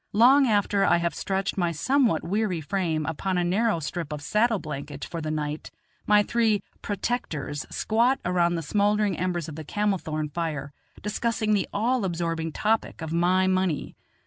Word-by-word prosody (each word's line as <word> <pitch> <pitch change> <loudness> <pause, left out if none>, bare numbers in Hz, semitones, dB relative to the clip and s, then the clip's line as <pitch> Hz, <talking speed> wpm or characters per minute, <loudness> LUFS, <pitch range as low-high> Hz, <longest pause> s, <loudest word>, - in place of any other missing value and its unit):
Long 260 +6 +6
after 205 -2 +2
I - - +4
have 170 0 -1
stretched 195 0 -2
my 175 -1 +1
somewhat 235 - +2
weary 190 0 0
frame 160 -2 -1
upon 180 +4 -2
a 175 - +2
narrow 195 +2 +1
strip 160 0 -4
of 150 -1 -5
saddle 220 +7 +2
blanket 145 -4 -6
for 170 - -5
the 155 - -3
night, 150 0 -3 0.4
my 210 0 +5
three 220 -3 +1 0.2
"protectors" 180 - -3
squat 235 +5 +1
around 175 -1 +2
the 165 - -3
smouldering 205 +2 +1
embers 175 -3 -2
of 155 - -7
the 160 - -5
camel 205 +4 0
thorn 155 -1 -3
fire, 150 -3 -3 0.3
discussing 215 0 0
the 200 - +1
all 235 +3 +1
absorbing 165 -2 -2
topic 215 -2 -1
of 160 0 -4
my 180 +2 +3
money. 185 -4 0
185 Hz, 170 wpm, -26 LUFS, 160-210 Hz, 0.4 s, Long